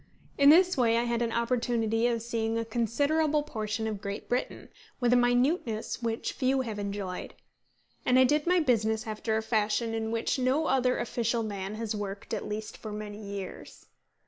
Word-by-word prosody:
In 280 Hz, 0 st, +6 dB
this 360 Hz, +4 st, +6 dB
way 230 Hz, -2 st, +3 dB
I 235 Hz, -, +2 dB
had 235 Hz, 0 st, -1 dB
an 230 Hz, -1 st, 0 dB
opportunity 235 Hz, -1 st, +1 dB
of 230 Hz, -2 st, -1 dB
seeing 230 Hz, -1 st, -1 dB
a 230 Hz, -, -1 dB
considerable 285 Hz, +7 st, +1 dB
portion 220 Hz, -5 st, -3 dB
of 215 Hz, -3 st, -3 dB
Great 200 Hz, +1 st, -5 dB
Britain, 245 Hz, +1 st, -3 dB, 0.3 s
with 245 Hz, -1 st, +3 dB
a -, -, +6 dB
minuteness 245 Hz, -1 st, +1 dB
which 230 Hz, -1 st, -2 dB
few 265 Hz, 0 st, +1 dB
have 220 Hz, -5 st, -4 dB
enjoyed. 200 Hz, -2 st, -4 dB, 0.7 s
And 250 Hz, -, +3 dB
I 260 Hz, -, +7 dB
did 295 Hz, +5 st, +2 dB
my 360 Hz, 0 st, +4 dB
business 220 Hz, -7 st, +1 dB
after 220 Hz, 0 st, -2 dB
a 220 Hz, -, -2 dB
fashion 220 Hz, +1 st, 0 dB
in 220 Hz, 0 st, -2 dB
which 230 Hz, +3 st, -1 dB
no 260 Hz, +5 st, +2 dB
other 255 Hz, -2 st, +2 dB
official 235 Hz, -1 st, -1 dB
man 200 Hz, -1 st, -4 dB
has 220 Hz, -1 st, -3 dB
worked, 200 Hz, -1 st, -5 dB
at -, -, -3 dB
least 215 Hz, +1 st, -5 dB
for 215 Hz, -, -7 dB
many 210 Hz, 0 st, -6 dB
years. 200 Hz, -2 st, -8 dB
230 Hz, 180 wpm, -29 LUFS, 215-250 Hz, 0.7 s, I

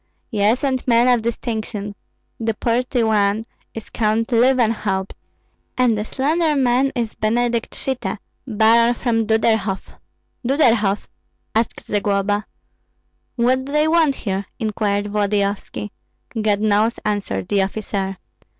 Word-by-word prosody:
"Yes, 215 Hz, +3 st, +2 dB
and 260 Hz, -2 st, 0 dB
men 235 Hz, 0 st, +4 dB
of 245 Hz, -2 st, +4 dB
distinction. 220 Hz, -3 st, -4 dB, 0.5 s
The 225 Hz, -1 st, -1 dB
portly 245 Hz, +2 st, 0 dB
one 215 Hz, 0 st, +2 dB, 0.3 s
is 225 Hz, -, -8 dB
Count 220 Hz, 0 st, 0 dB
Löwenhaupt, 230 Hz, -6 st, +2 dB, 0.7 s
and 250 Hz, -3 st, +3 dB
the 210 Hz, -, -2 dB
slender 305 Hz, +6 st, 0 dB
man 260 Hz, 0 st, +2 dB
is 230 Hz, -3 st, -2 dB
Benedikt 235 Hz, +1 st, 0 dB
Schitte, 265 Hz, -4 st, -3 dB, 0.3 s
Baron 230 Hz, +1 st, +4 dB
von 225 Hz, -3 st, 0 dB
Duderhoff." 220 Hz, -3 st, 0 dB, 0.4 s
"Duderhoff?" 235 Hz, -7 st, +2 dB, 0.5 s
asked 225 Hz, +1 st, -1 dB
Zagloba. 205 Hz, 0 st, 0 dB, 0.9 s
"What 255 Hz, +2 st, +2 dB
do 280 Hz, -, -7 dB
they 300 Hz, +1 st, +3 dB
want 315 Hz, -4 st, +3 dB
here?" 195 Hz, -4 st, -3 dB
inquired 205 Hz, -2 st, -1 dB
Volodyovski. 205 Hz, 0 st, -1 dB, 0.5 s
"God 210 Hz, -1 st, +1 dB
knows!" 215 Hz, +2 st, +2 dB
answered 200 Hz, -, -2 dB
the 200 Hz, -1 st, +2 dB
officer. 195 Hz, -1 st, -3 dB
220 Hz, 115 wpm, -20 LUFS, 205-245 Hz, 0.9 s, men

